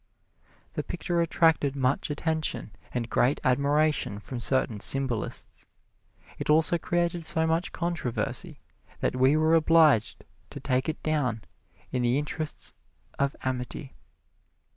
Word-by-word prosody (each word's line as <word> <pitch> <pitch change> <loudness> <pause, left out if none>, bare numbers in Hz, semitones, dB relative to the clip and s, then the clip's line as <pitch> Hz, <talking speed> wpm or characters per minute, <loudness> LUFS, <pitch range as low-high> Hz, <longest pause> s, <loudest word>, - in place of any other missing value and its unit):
The - - -2
picture 175 -2 -2
attracted 160 -4 +2
much 130 +1 0
attention 155 -5 -1 0.2
and 120 -2 -2
great 130 +4 +2
admiration 140 -4 +1
from 120 +4 -7
certain 120 -3 0
symbolists. 130 -2 0 0.7
It - - -4
also 160 +2 +4
created 175 0 -1
so 160 +1 +2
much 165 +2 0
controversy 170 -8 -3 0.4
that - - 0
we 130 +4 +4
were 155 +1 +3
obliged 160 -8 +4 0.2
to - - -8
take 130 +3 0
it 160 - -5
down 130 -9 0 0.5
in 125 - -1
the 120 +2 +2
interests 150 +1 -5 0.5
of 140 0 +1
amity. 130 +1 -4
145 Hz, 120 wpm, -27 LUFS, 125-160 Hz, 0.7 s, also